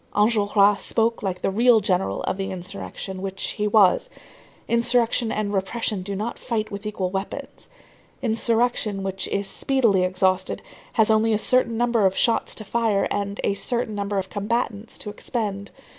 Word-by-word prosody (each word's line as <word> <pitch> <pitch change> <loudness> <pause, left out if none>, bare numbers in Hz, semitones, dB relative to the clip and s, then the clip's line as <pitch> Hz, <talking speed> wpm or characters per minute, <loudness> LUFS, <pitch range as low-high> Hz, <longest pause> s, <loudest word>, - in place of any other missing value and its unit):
Enjolras 205 -1 +3
spoke 230 0 +1
like 190 -3 -3
the - - +1
real 230 +3 +5
general 180 - 0
of 190 - -2
insurrection 185 - -6
which 195 0 -4
he 210 0 -1
was. 210 - +4 0.6
Insurrection 235 0 +2
and 210 -1 -2
repression 200 +1 -1
do 200 +2 -4
not 215 +4 -4
fight 220 -3 -2
with 200 +1 -5
equal 190 -3 -2
weapons. 195 +1 -6 0.5
Insurrection, 230 -3 0
which 190 -1 -3
is 200 0 -1
speedily 230 -7 +2
exhausted, 185 0 0 0.3
has 220 -1 +3
only 220 +1 +3
a - - +3
certain 235 +1 +2
number 235 -4 +3
of 190 - -2
shots 230 -1 +1
to 215 - -4
fire 220 -2 +1
and 200 0 -2
a 200 - +2
certain 235 +3 -1
number 200 0 -2
of 190 -1 -3
combatants 215 +1 -2
to 210 - -6
expend. 205 -2 -4
210 Hz, 160 wpm, -24 LUFS, 195-230 Hz, 0.6 s, real